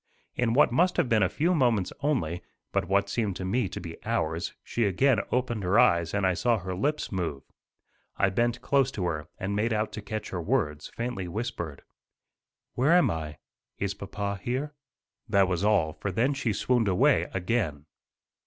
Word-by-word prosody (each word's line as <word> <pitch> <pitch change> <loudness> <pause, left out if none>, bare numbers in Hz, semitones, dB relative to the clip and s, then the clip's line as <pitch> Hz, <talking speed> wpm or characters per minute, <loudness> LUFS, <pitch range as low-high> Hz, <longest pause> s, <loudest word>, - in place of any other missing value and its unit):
In 120 -2 +1
what 140 - +5
must 180 +8 +2
have - - +2
been 110 -3 +3
a 95 - +3
few 165 - +1
moments 120 - +2
only, 120 - -1 0.3
but - - 0
what 100 +1 +2
seemed 100 -2 -1
to 95 - -5
me 105 +2 0
to - - -6
be 85 -1 -9
hours, 80 +2 -1
she 120 - -1
again 115 +5 +3
opened 125 -3 0
her 95 +3 +2
eyes 85 -6 +4
and 100 -2 +1
I 95 - +3
saw 115 +6 +2
her 95 -1 -5
lips 150 +11 -1
move. 85 -8 -3 0.7
I 100 - +2
bent 120 +4 0
close 135 -2 +3
to 95 - -2
her 80 -3 -2
and 100 +1 -3
made 110 +3 +1
out 105 0 -1
to 105 - -6
catch 105 +1 -5
her 90 - -3
words, 80 - -1
faintly 115 -6 -3
whispered. 85 - -5 0.9
"Where 135 +7 +3
am 180 0 +5
I? 75 -2 -5 0.4
Is 100 -1 -1
papa 100 0 -4
here?" 135 +7 -2 0.6
That 100 -3 +4
was 90 0 -1
all, 95 -7 +3
for 100 - -4
then 125 +9 +1
she 135 -5 -1
swooned 115 +2 +1
away 95 -2 +3
again. 90 -7 -1
100 Hz, 185 wpm, -28 LUFS, 90-120 Hz, 0.9 s, what